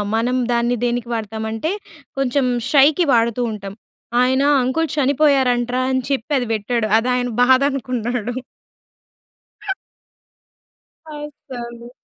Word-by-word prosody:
మనం 245 +3 +1
దాన్ని 240 +1 +1
దేనికి 240 0 -1
వాడతామంటే 220 - -3 0.5
కొంచెం 270 0 +1 0.3
షైకి 300 +4 +5
వాడుతూ 235 +1 +2
ఉంటాం. 200 -2 -7 0.5
ఆయన 260 +2 +3 0.2
అంకుల్ 315 +6 0
చనిపోయారంట్రా 260 -3 +2
అని 260 0 +1
చెప్పి 275 +1 -2
అది 245 - -3
పెట్టాడు 220 +1 -1
అది 240 +3 0
ఆయన 245 0 -1
బాధ 260 +1 +5
అనుకున్నాడు. 245 -2 -3 2.8
అస్సలు. 245 -5 -8
245 Hz, 100 wpm, -20 LUFS, 235-270 Hz, 2.8 s, షైకి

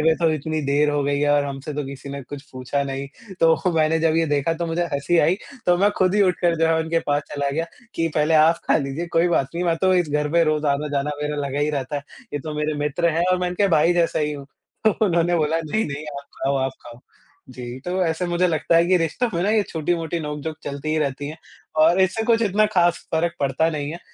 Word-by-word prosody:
हुए 160 +1 +4
तो 165 -2 +2
इतनी 155 +1 -2
देर 145 +2 +2
हो 145 -1 0
गई 140 0 0
है 145 0 +2
और 145 0 +3
हमसे 140 +1 -5
तो 145 -1 -3
किसी 140 +1 -8
ने 140 0 -6
कुछ 135 +2 -9
पूछा 130 +2 -2
नहीं। 135 0 -4 0.3
तो 165 +2 +3
मैंने 160 0 +2
जब 160 -1 +2
ये 165 - +3
देखा 145 +2 +1
तो 170 +1 -3
मुझे 170 +1 -1
हँसी 140 +5 +1
आई 165 +3 +4 0.3
तो 175 0 +4
मैं 205 +2 +4
ख़ुद 185 0 +3
ही 210 - +4
उठकर 175 -2 +2
जो 165 - +3
है 160 0 +2
उनके 160 +1 0
पास 145 0 +1
चला 140 -1 -1
गया 160 +4 -1 0.3
कि, 165 0 0
"पहले 155 +1 +2
आप 160 +2 +6
ख़ा - - +4
लीजिए, 145 +3 -3
कोई 165 +1 +2
बात 135 -6 +1
नहीं। 175 - -1
मैं 165 -1 +1
तो 185 0 +4
इस 175 -3 +2
घर 150 0 0
पे 170 0 +4
रोज़ 155 -1 0
आना-जाना 145 0 0
मेरा 150 0 -2
लगा 140 +1 -3
ही 150 +1 +1
रहता 140 0 -3
है। 140 - -4 0.3
ये 145 - -1
तो 155 0 -6
मेरे 150 0 -1
मित्र 150 +4 0
हैं 170 - +2
और 185 - +2
मैं 180 - 0
इनके 195 +3 +1
भाई 165 +4 +4
जैसा 170 -1 +1
ही 150 -1 0
हूँ।" 140 -2 -8 0.4
तो 220 - +6 0.2
उन्होंने 175 -1 +2
बोला, 160 0 +1
"नहीं, 215 +9 0
नहीं 145 +1 -5
आप 140 - -11 0.2
ख़ाओ, 140 +1 +1
आप 135 0 -1
ख़ाओ।" 120 0 -12 0.5
जी 125 0 -7
तो 185 +1 -1
ऐसे 165 +2 -1
मुझे 175 +1 +1
लगता 165 +1 +1
है 170 - +4
कि 185 +1 +4
रिश्तों 170 +9 0
में 170 - 0
ना 200 - +1
ये 215 -1 +3
छोटी-मोटी 165 +1 -2
नोक-झोंक 150 +1 -5
चलती 140 +1 -5
ही 155 - +1
रहती 145 -1 -2
हैं 155 +3 -8 0.5
और 175 +3 +4
इससे 190 +4 +2
कुछ 230 0 +3
इतना 215 0 +3
ख़ास 175 -1 +2
फ़र्क 165 +1 +1
पड़ता 140 +4 +1
नहीं 145 -1 -3
है। 170 - -6
155 Hz, 255 wpm, -22 LUFS, 145-170 Hz, 0.5 s, आप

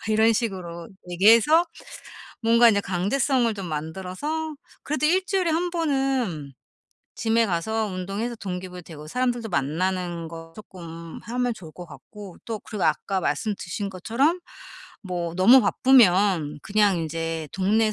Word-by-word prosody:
막 - - -8
이런 220 +1 +4
식으로 185 -7 -4 0.2
얘기해서 230 - +5 0.8
뭔가 230 +1 +6
인제 205 -3 +3
강제성을 230 +7 +1
좀 195 -3 -6
만들어서 185 - -4 0.3
그래도 305 +1 0
일주일에 370 +1 +1
1 345 +2 0
번은 270 - -1 0.6
짐에 230 0 +2
가서 215 +5 -1
운동해서 200 +5 -4
동기 185 -2 -5
부여되고 165 -4 -10
사람들도 240 +4 -1
만나는 175 +3 -2
거 165 0 -10
쪼끔 170 -5 -10
하면 245 +1 -1
좋을 165 -8 -12
것 175 -1 -10
같고 200 0 -12
또 225 -2 -4
그리고 210 -2 -7
아까 185 +5 0
말씀 205 +8 -1
드신 200 +3 -5
것처럼 235 - 0 0.6
뭐 175 -3 -4
너무 235 +9 +7
바쁘면 195 - +4
그냥 205 -2 +2
인제 165 -1 -3
동네 215 +3 +2
200 Hz, 295 characters per minute, -24 LUFS, 175-235 Hz, 0.8 s, 너무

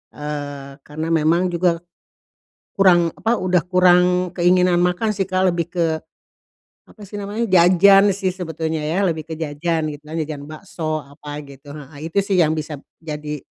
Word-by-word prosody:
Eee, 145 -2 -6
karena 155 +4 -5
memang 165 +3 +2
juga 170 -1 0 1.0
kurang, 175 -4 +5
apa, 230 +2 -1
sudah 185 -3 +1
kurang 180 0 +3
keinginan 180 0 +3
makan 180 +5 +1
sih, 195 -2 -2
Kak, 185 -1 +2
lebih 170 -1 -2
ke, 165 -3 -1 0.8
apa 210 -2 -15
sih 205 - -15
namanya, 205 +3 -3
jajan 190 +2 +6
sih 185 -1 -2
sebetulnya 160 -3 -4
ya, 180 +6 0
lebih 160 -2 -1
ke 160 - -5
jajan, 160 +1 -2
gitu 145 -1 -6
kan. 155 +2 -6
Jajan 155 -2 -4
bakso, 155 -1 -4
apa 145 +1 -10
gitu, 140 +1 -14
heeh, 150 +3 -9
itu 200 - -1
sih 195 - 0
yang 155 0 +2
bisa 155 0 -5 0.2
jadi, 150 -1 -6
170 Hz, 160 wpm, -20 LUFS, 155-185 Hz, 1.0 s, jajan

